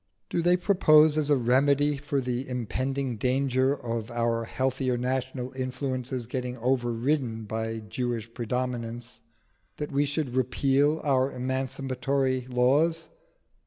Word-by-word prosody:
Do 170 - +1
they 175 +1 +4
propose 155 -5 +5
as 150 -1 0
a 145 - +5
remedy 140 +4 +3
for 140 0 -2
the 125 +1 -3
impending 130 +1 -2
danger 130 +2 +1
of 115 -2 -4
our 115 -1 0
healthier 130 +1 -1
national 130 0 -2
influences 130 -1 -3
getting 125 +1 -4
overridden 120 0 0
by 110 +1 -3
Jewish 115 +1 -4
predominance, 120 0 -4 0.6
that 150 0 -4
we 145 +1 +2
should 145 -2 -2
repeal 135 +4 +2
our 135 -1 +2
emancipatory 130 0 -1
laws? 140 +7 +2
130 Hz, 120 wpm, -27 LUFS, 120-140 Hz, 0.6 s, propose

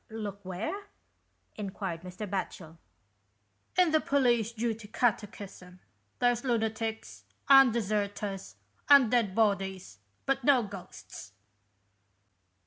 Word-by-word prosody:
" - - -44
Looked 205 -3 -6
where? 225 - -4 0.3
" - - -46 0.3
enquired 195 -4 -5
Mr. 185 +4 -7
Batchel. 170 -4 -5 1.0
"In 360 -3 +4
the 315 0 +3
'Police 240 -5 +2
Duty' 225 -2 -3
Catechism. 200 -5 -3 0.4
There's 245 -1 +1
lunatics, 225 -2 -2 0.2
and 270 -3 +8
deserters, 205 -3 -3 0.3
and 280 -6 +7
dead 225 -6 +1
bodies, 195 - 0 0.3
but 270 -1 0
no 260 -2 +4
ghosts." 185 - -10
215 Hz, 105 wpm, -29 LUFS, 195-240 Hz, 1.0 s, and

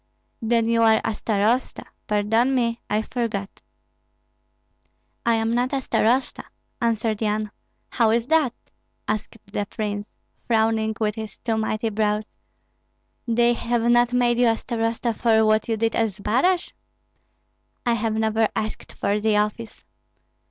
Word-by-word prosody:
"Then 230 0 +1
you 230 0 +2
are 220 -1 +5
a - - 0
starosta 220 +4 0 0.2
pardon 225 +5 +2
me, 235 -2 0
I 215 +1 +1
forgot." 215 -5 -4 1.7
"I 230 - +4
am 225 0 0
not 245 +3 0
a 275 - +1
starosta," 255 0 0 0.4
answered 225 -2 0
Yan. 215 -1 -1 0.4
"How 230 -3 +3
is 230 +1 +2
that?" 300 -4 +2 0.5
asked 215 +1 -3 0.2
the 205 -1 -2
prince, 205 -1 -5 0.3
frowning 220 -1 +1
with 210 -1 0
his 220 -2 -7
two 225 -2 -2
mighty 220 0 -1
brows; 210 0 0 1.0
"they 235 +1 +3
have 235 0 -1
not 240 0 +4
made 245 -1 +2
you 245 - +5
a 225 -1 +2
starosta 230 0 -2
for 220 -1 +3
what 215 0 +2
you 225 - +1
did 225 +1 0
at 225 -1 +2
Zbaraj?" 255 - +1 1.1
"I 240 - +3
have 225 -1 -1
never 220 0 +2
asked 215 0 -4
for 205 +1 0
the 210 0 +2
office." 210 +2 -3
225 Hz, 140 wpm, -23 LUFS, 215-235 Hz, 1.7 s, are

